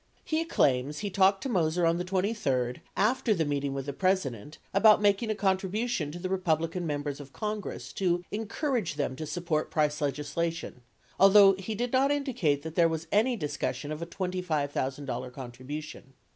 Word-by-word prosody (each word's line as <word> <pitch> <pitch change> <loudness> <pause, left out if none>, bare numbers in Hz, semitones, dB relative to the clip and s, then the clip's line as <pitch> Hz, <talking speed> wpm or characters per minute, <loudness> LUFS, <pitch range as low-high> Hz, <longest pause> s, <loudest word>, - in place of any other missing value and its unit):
He 320 +1 0
claims 140 - +1
he 200 - -2
talked 195 +1 +3
to - - -2
Moser 175 -4 +1
on 165 +1 +3
the - - -1
23d, 180 - -1 0.2
after 220 0 +2
the 165 -3 0
meeting 140 -1 -1
with 135 -1 -3
the 140 - -4
President, 150 - -1 0.2
about 215 +2 +6
making 205 +2 +2
a 215 - 0
contribution 190 -2 0
to 175 +3 -5
Republican 175 -2 0
Members 145 -1 -3
of 140 -2 -10
Congress 210 -1 -5
to 175 -2 0
encourage 225 - -2
them 140 -3 -2
to 155 +3 -6
support 170 -3 -1
price 150 -1 0
legislation 150 0 -2 0.2
— - - -32
although 195 0 +8
he 195 +3 -5
did 240 +3 -2
not 265 +2 +4
indicate 250 - 0
that 160 -1 -6
there 165 0 +4
was 160 0 -3
any 235 +5 +3
discussion 145 - -3
of 155 +1 -5
a 170 - -4
$25,000 145 -8 -2
contribution. 135 +2 -8
170 Hz, 170 wpm, -29 LUFS, 145-200 Hz, 0.2 s, although